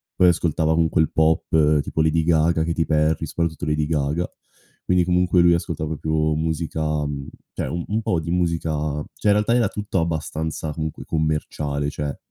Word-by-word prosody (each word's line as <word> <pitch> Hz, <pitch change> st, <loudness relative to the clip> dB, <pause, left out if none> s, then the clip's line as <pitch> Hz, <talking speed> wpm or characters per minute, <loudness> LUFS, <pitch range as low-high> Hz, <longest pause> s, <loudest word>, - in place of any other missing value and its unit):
Poi 90 Hz, -1 st, +5 dB
ascoltava 80 Hz, -2 st, +1 dB
comunque 80 Hz, 0 st, +2 dB
il 80 Hz, -, +1 dB
pop, 80 Hz, -1 st, +3 dB
tipo 80 Hz, -, -2 dB
Lady 80 Hz, +1 st, +2 dB
Gaga, 80 Hz, 0 st, +2 dB
Katy 80 Hz, 0 st, 0 dB
Perry, 75 Hz, 0 st, +1 dB
soprattutto 85 Hz, -3 st, -2 dB
Lady 75 Hz, 0 st, 0 dB
Gaga. 75 Hz, +2 st, 0 dB, 0.6 s
Quindi 90 Hz, -1 st, +3 dB
comunque 90 Hz, 0 st, +3 dB
lui 85 Hz, 0 st, +5 dB
ascolta 85 Hz, -2 st, -2 dB
proprio 80 Hz, 0 st, 0 dB
musica, 80 Hz, -1 st, -1 dB
mhmm 70 Hz, -1 st, -5 dB, 0.3 s
cioè -, -, -3 dB
un 85 Hz, 0 st, -3 dB
un 110 Hz, +2 st, -1 dB
po' 85 Hz, -, +1 dB
di 85 Hz, -, -6 dB
musica 85 Hz, -2 st, 0 dB, 0.4 s
cioè -, -, -3 dB
in -, -, +6 dB
realtà 105 Hz, +3 st, +2 dB
era 120 Hz, -4 st, +3 dB
tutto 105 Hz, -2 st, -2 dB
abbastanza, 80 Hz, -1 st, -3 dB
comunque, 80 Hz, 0 st, -5 dB
commerciale; 75 Hz, -2 st, -1 dB
cioè 75 Hz, -1 st, -4 dB
80 Hz, 170 wpm, -22 LUFS, 75-85 Hz, 0.6 s, in